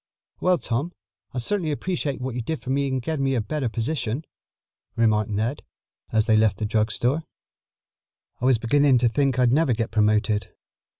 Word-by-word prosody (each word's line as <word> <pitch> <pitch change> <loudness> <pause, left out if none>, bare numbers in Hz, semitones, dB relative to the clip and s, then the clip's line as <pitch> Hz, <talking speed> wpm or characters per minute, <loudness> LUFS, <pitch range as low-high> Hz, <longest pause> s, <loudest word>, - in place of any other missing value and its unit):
"Well, 180 0 +3
Tom, 145 +6 -2 0.4
I - - -7
certainly 165 - 0
appreciate 150 -3 -2
what 130 0 -4
you 125 - -3
did 160 +6 -3
for 130 - -5
me 140 +1 +1
in 130 -1 -1
getting 150 +2 -2
me 135 -1 +1
a - - +1
better 130 +3 -2
position," 120 +3 -2 0.7
remarked 110 -2 +2
Ned 110 +7 -1 0.5
as 110 -1 +2
they 110 -2 +3
left 110 -3 +3
the 110 - -2
drug 110 +1 +1
store. 130 +9 0 1.2
"I - - -1
was 130 -2 +5
beginning 135 +4 +3
to 120 0 +3
think 135 +1 +1
I'd 125 -1 +3
never 150 -3 +3
get 115 0 -2
promoted. 105 -1 +1
125 Hz, 180 wpm, -24 LUFS, 110-145 Hz, 1.2 s, was